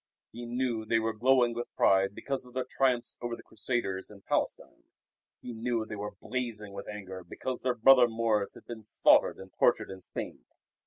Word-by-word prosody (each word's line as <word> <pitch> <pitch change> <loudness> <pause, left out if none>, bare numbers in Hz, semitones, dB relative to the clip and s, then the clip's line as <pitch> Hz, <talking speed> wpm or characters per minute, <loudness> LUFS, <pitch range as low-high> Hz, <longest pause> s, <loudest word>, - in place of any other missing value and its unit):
He 120 +1 -8
knew 120 -2 -1
they 115 +1 +1
were 115 0 0
glowing 120 +1 +3
with 120 +1 -5
pride 95 +1 +3
because 135 -1 -3
of 125 0 -14
their 130 -1 -1
triumphs 130 -3 +1
over 120 -1 -3
the - - -14
Crusaders 105 -4 -2
in 100 -2 -14
Palestine. - - -2 0.6
He 125 - -7
knew 115 0 -1
they 110 - -6
were 105 0 -6
blazing 110 -4 -4
with 100 0 -7
anger 95 -3 -7
because 130 +7 -5
their 125 -1 0
brother 125 +1 +7
Moors 110 -3 0
had - - -14
been 115 -2 -8
slaughtered 110 - +4
and 95 0 -12
tortured - - +3
in 95 -1 -9
Spain. - - -6
115 Hz, 190 wpm, -30 LUFS, 105-125 Hz, 0.6 s, brother